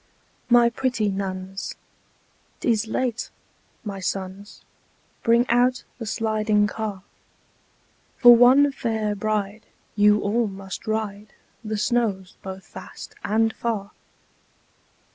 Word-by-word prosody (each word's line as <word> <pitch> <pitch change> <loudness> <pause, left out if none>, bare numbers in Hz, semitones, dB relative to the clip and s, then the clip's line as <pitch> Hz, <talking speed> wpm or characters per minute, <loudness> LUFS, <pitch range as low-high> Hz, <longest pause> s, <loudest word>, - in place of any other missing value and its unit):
"My 240 -1 +6
pretty 245 -4 0
nuns, 190 0 -4 0.8
't - - -4
is 220 0 0
late! 240 +1 -2 0.5
My 200 -3 -5
sons, 190 +1 -5 0.6
Bring 235 +2 +3
out 250 +2 +2 0.2
the 225 - -5
'Sliding 215 -1 +1
Car.' 210 -2 -4 1.1
For 240 -2 +9
one 260 +4 +6
fair 220 -5 -2
bride, 210 0 -3 0.3
you 210 0 +5
all 220 +3 0
must 195 +2 -8
ride 215 -1 -3 0.3
The 215 -1 -3
snows 205 -4 -1
both 190 0 -8
fast 190 - -10
and 220 +2 +1
far." 215 -4 -3
215 Hz, 105 wpm, -24 LUFS, 200-235 Hz, 1.1 s, For